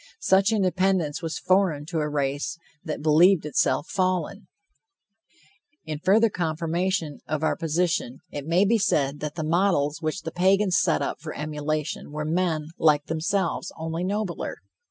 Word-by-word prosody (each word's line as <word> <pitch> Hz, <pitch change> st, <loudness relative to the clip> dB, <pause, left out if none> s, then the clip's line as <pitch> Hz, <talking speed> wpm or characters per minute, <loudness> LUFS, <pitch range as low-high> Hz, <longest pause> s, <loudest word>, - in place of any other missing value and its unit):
Such 195 Hz, -, +3 dB
independence 185 Hz, -6 st, +1 dB
was 165 Hz, -2 st, -3 dB
foreign 185 Hz, -6 st, +1 dB
to 165 Hz, 0 st, -3 dB
a 150 Hz, 0 st, -1 dB
race 145 Hz, +2 st, -2 dB, 0.3 s
that 155 Hz, -3 st, -5 dB
believed 160 Hz, +3 st, +5 dB
itself 130 Hz, -3 st, +1 dB
fallen. 185 Hz, +1 st, -1 dB, 1.4 s
In 155 Hz, -1 st, -4 dB
further 200 Hz, +7 st, +4 dB
confirmation 165 Hz, -1 st, -1 dB
of 155 Hz, 0 st, -2 dB
our 155 Hz, -, +2 dB
position, 165 Hz, -5 st, -1 dB
it 145 Hz, 0 st, -6 dB
may 175 Hz, +4 st, +3 dB
be 225 Hz, +2 st, +3 dB
said 145 Hz, -8 st, +1 dB
that 150 Hz, -1 st, -5 dB
the 160 Hz, -, -3 dB
models 160 Hz, -3 st, +1 dB
which 155 Hz, +3 st, -3 dB
the 165 Hz, -, -4 dB
Pagans 190 Hz, +2 st, +2 dB
set -, -, +1 dB
up -, -, -4 dB
for 155 Hz, 0 st, -7 dB
emulation 150 Hz, 0 st, -3 dB
were 150 Hz, 0 st, -4 dB
men 160 Hz, -2 st, 0 dB
like 150 Hz, -2 st, +3 dB
themselves, 170 Hz, +3 st, -1 dB
only 165 Hz, +2 st, -3 dB
nobler. 200 Hz, -1 st, -3 dB
165 Hz, 150 wpm, -25 LUFS, 150-185 Hz, 1.4 s, believed